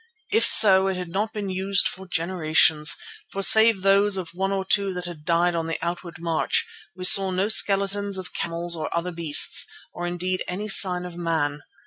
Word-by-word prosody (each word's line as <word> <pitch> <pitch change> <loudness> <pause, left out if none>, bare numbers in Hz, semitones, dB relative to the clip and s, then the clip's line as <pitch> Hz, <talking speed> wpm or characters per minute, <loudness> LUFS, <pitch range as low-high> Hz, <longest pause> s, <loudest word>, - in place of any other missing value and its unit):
If 445 +3 +2
so, 190 -3 +6
it 190 - -2
had 180 -2 -7
not 210 +5 -3
been 205 -3 -6
used 195 +1 0
for 190 +1 -8
generations, 160 -3 +1 0.3
for 195 - -4
save 220 -2 +5
those 195 0 +2
of 180 -3 -6
one 190 +2 -3
or 195 -1 -3
two 195 -1 0
that 180 0 -5
had 165 -4 -10
died 175 +1 0
on 165 -1 -4
the 165 - -4
outward 170 +1 -6
march, 165 -1 -2 0.3
we 185 0 -6
saw 195 +1 +5
no 185 +3 -2
skeletons 200 -1 +2
of 185 -3 -8
camels 170 +1 -3
or 155 -1 -5
other 175 +2 -4
beasts, 165 -4 +2 0.3
or 175 0 -6
indeed 180 +1 -4
any 200 +4 -5
sign 180 -3 +2
of 175 -1 -10
man. 160 -4 -3
185 Hz, 190 wpm, -22 LUFS, 170-195 Hz, 0.3 s, so